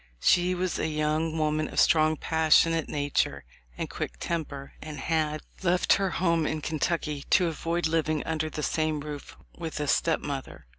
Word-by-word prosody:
She 180 - +3
was 180 -1 -1
a - - 0
young 155 +1 0
woman 155 0 +1
of - - -2
strong, 155 -1 +4
passionate 160 0 +3
nature 145 -1 0 0.3
and - - -3
quick - - -5
temper, 145 -5 -4
and 155 -1 -7
had 155 +1 0 0.2
"left 180 0 +3
her 195 -1 +1
home 165 -3 +1
in 155 -1 -2
Kentucky 150 -2 -1
to 185 - +5
avoid 165 +1 -1
living 155 -1 +1
under 160 -1 -1
the 150 0 -5
same 155 -1 0
roof 145 -1 -7 0.2
with 165 -3 -5
a 150 - -1
stepmother." 140 - -1
155 Hz, 160 wpm, -27 LUFS, 150-165 Hz, 0.3 s, to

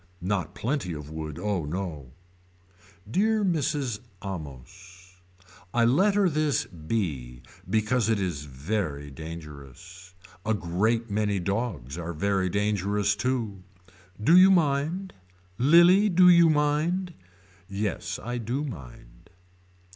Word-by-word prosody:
Not 90 -4 -2
plenty 120 - -2
of 75 -1 -8
wood 80 -1 -6
oh 100 -2 -1
no. 75 -5 -5 0.9
Dear 210 - +1
Mrs. 145 - -1 0.3
Amos. 90 +3 -9 0.6
I 120 -1 +4
letter 195 - +3
this 155 -5 0
B 75 - -4 0.3
because 110 +1 +1
it 110 -2 +2
is 85 -7 -3
very 75 0 -3
dangerous. 80 +4 -10 0.3
A 110 0 +1
great 110 +6 0
many 105 -1 0
dogs 95 - -3
are 85 0 -4
very 95 +3 0
dangerous 105 +1 0
too. 110 -4 -2 0.6
Do 140 +11 +4
you 185 +1 +8
mind. 170 +2 +1 0.5
Lilie 175 - +6
do 180 0 +5
you 170 -2 +7
mind. 155 +5 +1 0.6
Yes 100 -1 -3
I 120 +1 -3
do 120 +6 -2
mind. - - -10
105 Hz, 110 wpm, -26 LUFS, 85-140 Hz, 0.9 s, you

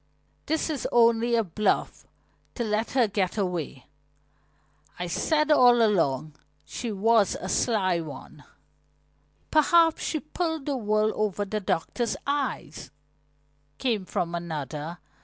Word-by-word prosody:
"This 315 0 0
is 290 - -3
only 235 0 +4
a 230 - +2
bluff 210 +3 -1 0.5
to 240 - -2
let 215 0 -1
her 250 -4 +3
get 195 -1 -1
away. 175 -9 -3 1.1
I 180 - -3
said 305 - +1
all 245 -4 +6
along 155 - +1 0.3
she 235 -2 -5
was 210 0 +2
a 185 - -6
sly 190 -4 +1
one." 155 -3 -9 1.1
"Perhaps 325 +1 +4
she 310 - -1
pulled 320 -1 -3
the 285 - -1
wool 215 -2 +1
over 205 -1 -1
the 215 +2 -3
doctor's 210 +5 -2
eyes," 275 - -3 0.9
came 225 -7 -1
from 170 -1 -2
another. 160 -1 -5
215 Hz, 120 wpm, -26 LUFS, 180-250 Hz, 1.1 s, all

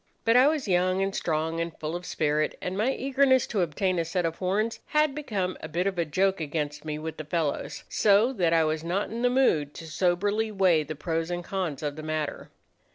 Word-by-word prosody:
But 230 +1 +4
I 255 +2 +7
was 300 -5 0
young 185 +1 +2
and 195 0 -2
strong 160 0 -1
and 165 -1 -3
full 155 +2 -4
of 175 +1 -6
spirit, 150 0 0
and 180 - -4
my 220 +6 +1
eagerness 265 -1 +2
to 205 - -1
obtain 180 +2 0
a - - +1
set 175 +2 -1
of 165 0 -2
horns 205 +5 0
had 300 -2 +2
become 205 -11 -3
a - - -5
bit 175 +4 -1
of 190 -3 -1
a 170 - +2
joke 190 +4 +1
against 150 -1 -3
me 150 -1 -4
with 160 +1 -6
the 155 - -5
fellows; 155 -1 -2
so 215 +5 +3
that 175 -8 +1
I 165 -1 +4
was 155 0 -1
not 180 +6 -1
in 230 +1 -4
the 245 - +3
mood 165 - +2
to 165 - -8
soberly 200 +7 0
weigh 185 -6 +3
the 155 +1 -5
pros 165 +2 -2
and 175 0 -3
cons 175 -7 -3
of 145 0 -3
the - - -5
matter. 155 -1 -3
175 Hz, 225 wpm, -27 LUFS, 155-205 Hz, -, I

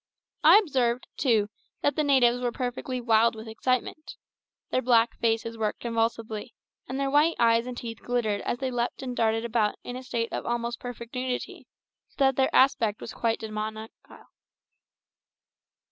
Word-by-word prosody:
I - - +9
observed, 255 - +1
too, 225 -6 +2 0.4
that 285 - +2
the 305 - +1
natives 250 -4 +4
were 245 -1 0
perfectly 250 +1 -3
wild 230 -1 +3
with 220 +1 -9
excitement. 255 +7 -2 0.6
Their 255 - +1
black 235 -2 +3
faces 230 0 0
worked 215 -1 -2
convulsively, 230 -1 -2 0.3
and 265 +1 -3
their 275 0 0
white 300 +4 +4
eyes 230 +1 +3
and 250 -1 -6
teeth 230 -2 -7
glittered 225 -4 -1
as - - -2
they 260 0 -3
leaped 245 +2 -2
and 250 -1 -4
darted 225 0 +1
about 220 -2 +1
in 245 - -6
a 255 - -6
state 235 -2 -3
of - - -2
almost 235 0 -2
perfect 240 -1 -8
nudity, 250 -1 -4 0.4
so - - -31
that 270 -1 +3
their 265 0 +2
aspect 230 -5 +3
was - - -8
quite 230 -1 0
demoniacal. 220 0 -7
235 Hz, 160 wpm, -27 LUFS, 225-255 Hz, 0.6 s, I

